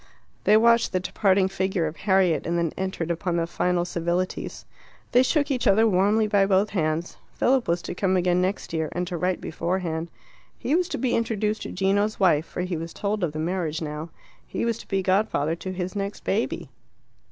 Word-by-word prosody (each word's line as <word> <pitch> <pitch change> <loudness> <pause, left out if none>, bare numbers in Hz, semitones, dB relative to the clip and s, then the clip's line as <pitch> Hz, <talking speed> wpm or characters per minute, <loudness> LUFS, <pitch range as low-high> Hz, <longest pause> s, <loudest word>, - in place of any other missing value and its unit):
They 210 - +6
watched 235 +1 +4
the 185 - +2
departing 190 +1 +2
figure 190 -2 -1
of 155 0 -4
Harriet, 185 -4 +2
and 170 +1 0
then 170 -2 0
entered 190 -3 -2
upon 170 +1 -1
the 165 - +1
final 175 +1 0
civilities. 175 +1 -2 0.5
They 245 - +6
shook 290 +2 +1
each 255 -2 0
other 220 +3 +5
warmly 205 +3 +3
by 200 -2 +3
both 195 +2 +2
hands. 160 -2 -1 0.2
Philip 260 -1 +2
was 170 0 0
to - - -4
come 185 +1 +1
again 180 0 +2
next 185 -2 -2
year, 160 -2 -1
and 180 0 -1
to 180 0 -5
write 180 +2 0
beforehand. 170 -1 -2 0.5
He 275 - -2
was 355 +2 +2
to - - -3
be 255 -2 0
introduced 220 -2 -1
to - - -5
Gino's 200 +3 +1
wife, 165 -5 +3
for - - -4
he 180 -2 -2
was 165 +1 -6
told 205 -1 -2
of 165 - 0
the 155 - -7
marriage 160 -1 -1
now. 155 +1 -5 0.4
He - - -2
was 230 -1 -1
to - - -12
be 195 -1 0
godfather 185 -5 +1
to 185 +2 -5
his 185 +1 -4
next 200 0 -4
baby. 215 +4 -1
185 Hz, 200 wpm, -25 LUFS, 170-205 Hz, 0.5 s, They